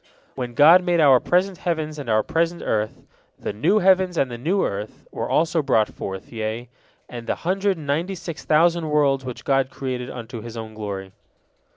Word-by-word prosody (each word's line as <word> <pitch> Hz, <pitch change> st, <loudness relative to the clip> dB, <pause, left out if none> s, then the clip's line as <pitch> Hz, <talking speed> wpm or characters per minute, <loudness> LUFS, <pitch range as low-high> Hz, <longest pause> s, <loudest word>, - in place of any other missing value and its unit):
When 125 Hz, -2 st, -5 dB
God 165 Hz, +7 st, +7 dB
made 175 Hz, -1 st, +1 dB
our 135 Hz, -5 st, +6 dB
present 180 Hz, +4 st, +1 dB
heavens 155 Hz, -3 st, -2 dB
and 135 Hz, -5 st, -6 dB
our 110 Hz, -1 st, +3 dB
present 170 Hz, +1 st, -1 dB
earth, 110 Hz, 0 st, -2 dB, 0.3 s
"the -, -, -4 dB
new 120 Hz, -, +2 dB
heavens 185 Hz, -2 st, +3 dB
and 130 Hz, -, +1 dB
the 120 Hz, -, -5 dB
new 180 Hz, +9 st, +1 dB
earth" 100 Hz, +2 st, -5 dB
were -, -, -4 dB
also 165 Hz, 0 st, +2 dB
brought 110 Hz, -6 st, +2 dB
forth, 95 Hz, +4 st, -7 dB
yea, 110 Hz, +2 st, -4 dB, 0.4 s
and 120 Hz, -1 st, -8 dB
the -, -, 0 dB
hundred 190 Hz, +2 st, 0 dB
and 155 Hz, -, -9 dB
ninety 165 Hz, +7 st, -1 dB
six 170 Hz, -2 st, -7 dB
thousand 165 Hz, +1 st, +3 dB
worlds 140 Hz, -3 st, +2 dB
which 125 Hz, -2 st, -7 dB
God 135 Hz, -1 st, +2 dB
created 130 Hz, -3 st, -4 dB
unto 120 Hz, -1 st, -7 dB
His 115 Hz, +1 st, -8 dB
Own 110 Hz, -1 st, -7 dB
glory. 100 Hz, -3 st, -6 dB
140 Hz, 190 wpm, -23 LUFS, 115-170 Hz, 0.4 s, God